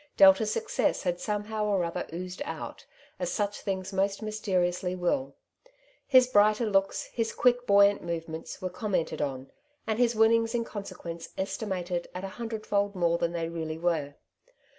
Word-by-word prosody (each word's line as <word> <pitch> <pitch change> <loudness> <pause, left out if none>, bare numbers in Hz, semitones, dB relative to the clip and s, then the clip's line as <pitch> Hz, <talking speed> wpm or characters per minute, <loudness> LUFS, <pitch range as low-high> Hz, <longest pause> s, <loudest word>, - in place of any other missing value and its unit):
Delta's 195 +2 +7
success 455 - 0
had 175 -2 -1
somehow 210 +1 -2
or 200 -4 +1
other 170 0 -3
oozed 180 - -6
out, - - -7 0.3
as - - -1
such 205 -1 -2
things 190 -1 -3
most 195 +2 0
mysteriously 185 -4 0
will. 265 +10 -1 0.7
His 255 -3 +7
brighter 215 -1 +4
looks, 195 -2 +1
his 230 -1 -1
quick 245 0 +2
buoyant 200 0 +5
movements, 165 +1 -5
were 185 - -2
commented 185 -4 -1
on, 135 -2 -3 0.3
and 220 0 -1
his 240 -1 +3
winnings 225 +1 +4
in 235 - +1
consequence 185 -6 -7
estimated 185 -3 -2
at 180 - -5
a 195 - -4
hundredfold 210 -3 -1
more 170 -1 +2
than 170 - 0
they 165 -1 -2
really 160 -1 -4
were. 160 -4 -1
195 Hz, 155 wpm, -28 LUFS, 175-215 Hz, 0.7 s, Delta's